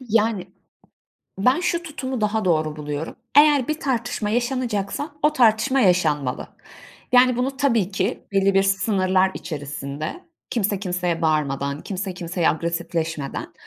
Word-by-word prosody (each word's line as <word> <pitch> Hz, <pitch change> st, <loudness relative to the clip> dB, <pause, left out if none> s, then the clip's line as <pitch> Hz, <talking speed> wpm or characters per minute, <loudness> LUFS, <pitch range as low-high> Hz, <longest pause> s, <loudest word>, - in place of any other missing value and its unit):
Yani 220 Hz, -5 st, 0 dB, 0.9 s
Ben 255 Hz, -, +3 dB
şu 345 Hz, -1 st, 0 dB
tutumu 265 Hz, -6 st, -5 dB
daha 215 Hz, 0 st, 0 dB
doğru 155 Hz, -3 st, +1 dB
buluyorum. 150 Hz, +1 st, -5 dB, 0.2 s
Eğer 290 Hz, -3 st, +6 dB
bir 310 Hz, +1 st, -2 dB
tartışma 245 Hz, -5 st, -1 dB
yaşanacaksa, 240 Hz, +1 st, -1 dB
o 300 Hz, +1 st, +4 dB
tartışma 255 Hz, +1 st, +3 dB
yaşanmalı. 155 Hz, -, +1 dB, 0.6 s
Yani, 250 Hz, 0 st, +6 dB
bunu 265 Hz, +2 st, -1 dB
tabii 230 Hz, -9 st, +1 dB
ki 195 Hz, -, -2 dB
belli 195 Hz, 0 st, +3 dB
sınırlar 190 Hz, -1 st, +2 dB
içerisinde, 145 Hz, -, -6 dB, 0.3 s
kimse 205 Hz, -4 st, 0 dB
kimseye 180 Hz, -3 st, -2 dB
bağırmadan, 140 Hz, -2 st, 0 dB
kimse 195 Hz, -1 st, -4 dB
kimseye 175 Hz, -1 st, -1 dB
agresifleşmeden. 165 Hz, -2 st, -3 dB
195 Hz, 120 wpm, -22 LUFS, 165-245 Hz, 0.9 s, Eğer